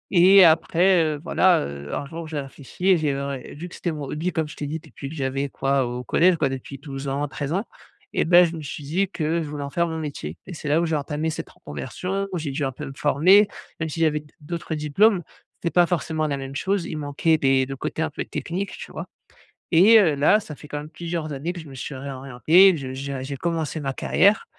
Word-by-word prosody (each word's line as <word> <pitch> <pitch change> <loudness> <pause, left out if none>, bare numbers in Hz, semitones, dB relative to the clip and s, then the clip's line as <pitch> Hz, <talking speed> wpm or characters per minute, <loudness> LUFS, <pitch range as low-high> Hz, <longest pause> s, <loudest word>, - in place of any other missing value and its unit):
et 190 +2 +8
après, 170 +2 +4
heu, 155 -2 -1
voilà, 180 0 +3
heu, 70 0 -7
un 140 - -3
jour 165 +2 -7
j'ai 155 -2 -3
réfléchi 140 +7 -4
et 185 - +6
j'ai, 150 -3 0
heu, 140 0 -3
ré 135 -3 -6
vu 175 +3 -6
que - - -14
c'était 170 - -2
mon 150 -2 -5
hobby 170 +4 -2
comme 160 -1 -1
je 150 - -10
t'ai 145 - -4
dit 160 +2 -3
depuis 140 -3 -9
que 160 - -8
j'avais 135 0 -2
quoi, 135 -1 0
au 125 +1 -5
collège 175 +8 +4
quoi, 140 -3 +1
depuis 135 +1 -6
12 140 0 -7
ans, 140 +2 -1
13 140 +2 -5
ans 195 +5 -1 0.5
et - - +1
beh, 175 +1 +7
je 165 0 -4
me 160 - -6
suis 145 0 -7
dit 180 +7 0
que 165 -1 -1
je 150 - -5
voulais 145 -1 -5
en 140 - -6
faire 170 0 +1
mon 160 0 -4
métier 140 - -5
et 180 - -8
c'est 150 - -7
là 155 +3 +4
où - - +1
j'ai 160 -1 0
entamé 150 +2 -2
cette - - -6
reconversion, 180 - -5
où 180 - -2
j'ai 150 -3 -3
dû 145 +2 -2
un 135 - 0
peu - - -8
me 135 - -7
former, 185 +9 +5 0.3
même 160 0 -2
si 165 - -5
j'avais 150 -2 +2
d 150 - -22
d'autres 165 +1 -4
diplômes, 175 +6 +3 0.3
c'était 170 - -3
pas 175 -1 +5
forcément 160 -3 -1
la 140 -1 -1
même 135 0 -7
chose, 190 +3 0
il 155 - -5
manquait 150 +2 +1
des 135 -1 +3
le 135 +1 -6
côté 155 - -4
un 160 - -1
peu - - -4
technique, 190 +4 -4
tu - - -9
vois? - - -6 0.6
Et 205 +7 +7
heu, 160 -7 +3
là, 150 +9 +4
ça 160 -8 -9
fait 150 - -13
quand 145 - -4
même 150 +1 -9
plusieurs 165 -1 -4
années 150 +6 -3
que 175 - -7
je 160 - -10
me 135 - -11
suis 135 +2 -6
réorienté, 140 +7 +4
que - - -3
je 130 -1 -6
j'ai 140 +1 -5
un 130 - -4
j'ai 140 +1 -5
commencé 165 -1 -2
ma 135 -1 -2
carrière 200 +9 +3
155 Hz, 260 wpm, -24 LUFS, 140-170 Hz, 0.6 s, et